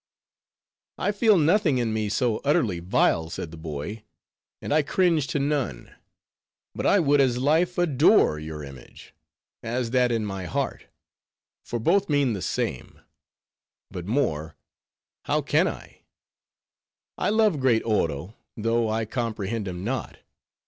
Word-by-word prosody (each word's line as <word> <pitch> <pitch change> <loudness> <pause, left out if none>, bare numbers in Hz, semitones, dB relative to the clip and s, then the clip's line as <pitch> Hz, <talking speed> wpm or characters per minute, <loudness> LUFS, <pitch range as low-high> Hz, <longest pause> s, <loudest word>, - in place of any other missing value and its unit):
"I - - 0
feel 210 0 +4
nothing 165 -2 +3
in 115 -3 0
me 110 -1 -1
so 115 0 0
utterly 120 - +1
vile," 85 -3 +1
said 80 -1 -6
the - - -9
boy, 80 +7 -6 0.6
"and - - -3
I 155 - +4
cringe 165 -1 +1
to - - -2
none. 140 - -2 0.8
But - - -2
I 205 - +5
would 145 -3 +3
as 125 -3 +2
lief 160 +7 +1
adore 155 - +4
your 75 -1 -7
image, 70 -3 -13 0.5
as 120 0 -3
that 125 -1 +3
in 115 -2 0
my 95 -2 -5
heart, 85 - -3 0.8
for 120 - -4
both 195 - +2
mean 140 -5 +2
the 100 - -4
same; - - -3 0.9
but 90 -2 -7
more, 80 - -1 0.7
how 150 +1 +1
can 155 +6 +2
I? - - -8 1.2
I - - +1
love 215 -7 +2
great 125 -4 +2
Oro, 90 -4 -1 0.2
though 115 +1 0
I 110 +1 -1
comprehend 110 -2 -3
him 90 0 -5
not. 120 +1 -4
120 Hz, 140 wpm, -25 LUFS, 95-145 Hz, 1.2 s, I